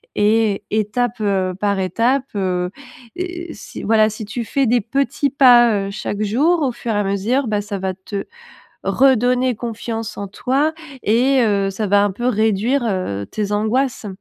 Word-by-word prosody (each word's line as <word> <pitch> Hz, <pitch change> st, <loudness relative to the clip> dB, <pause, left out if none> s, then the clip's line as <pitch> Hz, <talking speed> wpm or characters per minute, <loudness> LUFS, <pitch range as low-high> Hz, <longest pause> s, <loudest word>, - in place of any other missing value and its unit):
et 210 Hz, -1 st, +2 dB
étape, 220 Hz, +3 st, -1 dB
heu, 190 Hz, -3 st, 0 dB
par 200 Hz, -1 st, 0 dB
étape. 235 Hz, +8 st, +1 dB
Heu, 180 Hz, -2 st, -1 dB, 0.5 s
et 350 Hz, -1 st, -5 dB
si -, -, -9 dB
voilà, 215 Hz, 0 st, +4 dB
si 215 Hz, +1 st, -7 dB
tu 230 Hz, +3 st, -4 dB
fais 270 Hz, +5 st, 0 dB
des 240 Hz, +2 st, +3 dB
petits 275 Hz, +5 st, 0 dB
pas, 240 Hz, -7 st, +5 dB
heu, -, -, -5 dB
chaque 205 Hz, 0 st, -4 dB
jour 295 Hz, +12 st, +2 dB
au 265 Hz, -, +1 dB
fur 235 Hz, -1 st, -4 dB
et -, -, -1 dB
à -, -, +1 dB
mesure, 215 Hz, +7 st, 0 dB
bah, 210 Hz, -1 st, 0 dB
ça 205 Hz, -1 st, -5 dB
va 190 Hz, 0 st, -2 dB
te 195 Hz, +2 st, -6 dB, 0.6 s
redonner 255 Hz, -1 st, +3 dB
confiance 225 Hz, -1 st, -5 dB
en 200 Hz, -, -4 dB
toi 270 Hz, +9 st, 0 dB, 0.3 s
et, 255 Hz, +5 st, +3 dB
heu, 200 Hz, -3 st, +1 dB
ça 210 Hz, +2 st, -3 dB
va 200 Hz, +1 st, +4 dB
un 205 Hz, -, 0 dB
peu 240 Hz, +5 st, -4 dB
réduire, 220 Hz, +4 st, +1 dB
heu, 185 Hz, -, -2 dB
tes 210 Hz, -1 st, -3 dB
angoisses. 225 Hz, +3 st, 0 dB
220 Hz, 175 wpm, -19 LUFS, 200-250 Hz, 0.6 s, pas